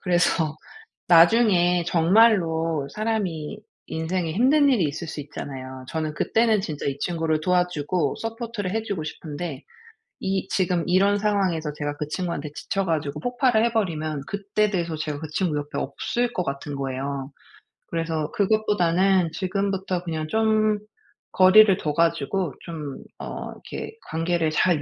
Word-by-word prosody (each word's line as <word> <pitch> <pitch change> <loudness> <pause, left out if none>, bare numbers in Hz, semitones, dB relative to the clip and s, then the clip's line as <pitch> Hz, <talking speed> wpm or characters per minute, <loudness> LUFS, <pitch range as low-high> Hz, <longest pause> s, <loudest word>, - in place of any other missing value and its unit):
그래서 175 -3 +1 0.5
나중에 175 -1 +5
정말로 165 -5 +3
사람이 210 -5 -2 0.3
인생에 165 +1 -2
힘든 280 - +4
일이 230 -11 +3
있을 155 +3 -3
수 150 - -5
있잖아요. 130 -2 -7
저는 155 -1 -2
그때는 220 +1 +2
진짜 155 -6 -5
이 140 0 -2
친구를 160 -2 0
도와 180 +1 +2
주고 150 -1 -1
서포트를 225 -4 -4
해 225 0 0
주고 195 -8 -4
싶은데 150 -1 -6 0.6
이 195 0 -1
지금 180 -3 +1
이런 195 +3 +4
상황에서 190 -7 0
제가 145 -1 -4
그 150 - -3
친구한테 165 -5 -3
지쳐 195 +4 -2
가지고 150 -3 -1
폭발을 245 -1 +2
해버리면 160 -10 -1
그때 200 +1 0
돼서 170 -4 -2
제가 150 -2 -4
그 160 - -6
친구 170 -6 0
옆에 145 0 -5
없을 240 - -2
것 180 - -1
같은 140 0 -4
거예요. 135 0 -4 0.6
그래서 165 -2 -2
그것보다는 190 -4 +2
지금부터 190 -1 -2
그냥 160 -2 -3
좀 215 -1 +2 0.5
거리를 190 +1 +7
둬 150 -2 -2
가지고 165 +1 +1
좀 150 -5 -6 0.2
어 - - -6
이렇게 - - -8 0.2
관계를 165 0 0
잘 165 -2 +2
175 Hz, 310 characters per minute, -24 LUFS, 155-200 Hz, 0.6 s, 거리를